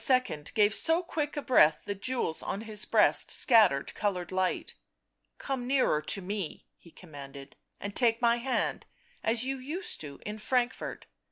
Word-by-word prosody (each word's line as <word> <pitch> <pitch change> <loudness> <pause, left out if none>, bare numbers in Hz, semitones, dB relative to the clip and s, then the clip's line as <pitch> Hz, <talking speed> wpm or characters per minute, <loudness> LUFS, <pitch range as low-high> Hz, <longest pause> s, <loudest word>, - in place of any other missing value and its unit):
gave 210 -1 +4
so 325 +9 +2
quick 300 -3 -3
a 290 - -2
breath 155 -11 +4
the 205 - -2
jewels 200 -4 -2
on 200 - -4
his 215 -2 -4
breast - - +3
scattered 215 - +4
coloured 190 -4 -2
light. 185 0 -1 0.3
" - - -54 0.3
Come 260 -3 -4
nearer 255 - +2
to 190 +5 -4
me," 195 -3 -5
he 170 - -18
commanded, 140 -5 -11
" - - -43
and 200 0 -6
take 230 -2 +3
my 235 -1 +3
hand 255 +2 -2 0.2
— - - -33
as 235 +1 -1
you 270 0 -3
used 315 +9 -5
to, 140 -2 -9
in 210 +1 -5
Frankfort 245 +2 -1
215 Hz, 170 wpm, -29 LUFS, 180-255 Hz, 0.3 s, gave